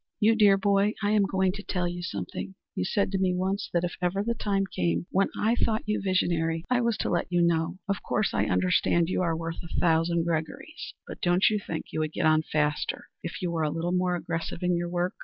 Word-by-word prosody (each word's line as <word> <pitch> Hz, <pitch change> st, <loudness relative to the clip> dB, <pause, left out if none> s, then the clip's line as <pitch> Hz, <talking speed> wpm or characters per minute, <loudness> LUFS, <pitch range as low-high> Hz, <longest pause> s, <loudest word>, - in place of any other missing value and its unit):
"You 220 Hz, +2 st, +5 dB
dear 205 Hz, -3 st, +6 dB
boy, 200 Hz, +1 st, +2 dB
I 205 Hz, -, +2 dB
am 205 Hz, -2 st, +3 dB
going 190 Hz, -1 st, +1 dB
to 205 Hz, +2 st, -7 dB
tell 180 Hz, -3 st, -2 dB
you 175 Hz, 0 st, -4 dB
something. 95 Hz, -, -5 dB, 0.2 s
You 90 Hz, -, -2 dB
said 200 Hz, -, 0 dB
to 195 Hz, -, 0 dB
me 185 Hz, -1 st, +2 dB
once 190 Hz, +2 st, -1 dB
that 170 Hz, 0 st, +1 dB
if 175 Hz, -, -2 dB
ever 185 Hz, +3 st, 0 dB
the 235 Hz, +2 st, 0 dB
time 200 Hz, -3 st, 0 dB
came 85 Hz, -, -1 dB
when 195 Hz, +1 st, +2 dB
I 220 Hz, +2 st, +3 dB
thought 225 Hz, -2 st, +1 dB
you 210 Hz, 0 st, -1 dB
visionary, 170 Hz, -3 st, 0 dB
I 250 Hz, -1 st, +3 dB
was 235 Hz, -2 st, +1 dB
to -, -, -1 dB
let 175 Hz, 0 st, -1 dB
you 175 Hz, -1 st, +3 dB
know. 170 Hz, +1 st, +1 dB
Of 200 Hz, 0 st, -1 dB
course 210 Hz, -2 st, 0 dB
I -, -, +1 dB
understand 90 Hz, -, +2 dB
you 185 Hz, -, 0 dB
are 165 Hz, -2 st, 0 dB
worth 165 Hz, 0 st, -5 dB
a 170 Hz, -, -4 dB
thousand 165 Hz, 0 st, +2 dB
Gregorys; 170 Hz, -, -4 dB
but -, -, -9 dB
don't 175 Hz, +3 st, +4 dB
you 210 Hz, -, +1 dB
think 165 Hz, -5 st, -6 dB
you -, -, -1 dB
would 155 Hz, 0 st, -1 dB
get -, -, -1 dB
on 155 Hz, 0 st, +5 dB
faster 150 Hz, -1 st, -1 dB
if 170 Hz, +2 st, -6 dB
you 175 Hz, -, 0 dB
were 165 Hz, -1 st, -1 dB
a 155 Hz, -, +1 dB
little 165 Hz, +3 st, -2 dB
more 180 Hz, 0 st, +1 dB
aggressive 170 Hz, +1 st, -4 dB
in 180 Hz, 0 st, +2 dB
your 175 Hz, 0 st, -2 dB
work? 175 Hz, +1 st, -1 dB
175 Hz, 240 wpm, -27 LUFS, 165-195 Hz, 0.2 s, dear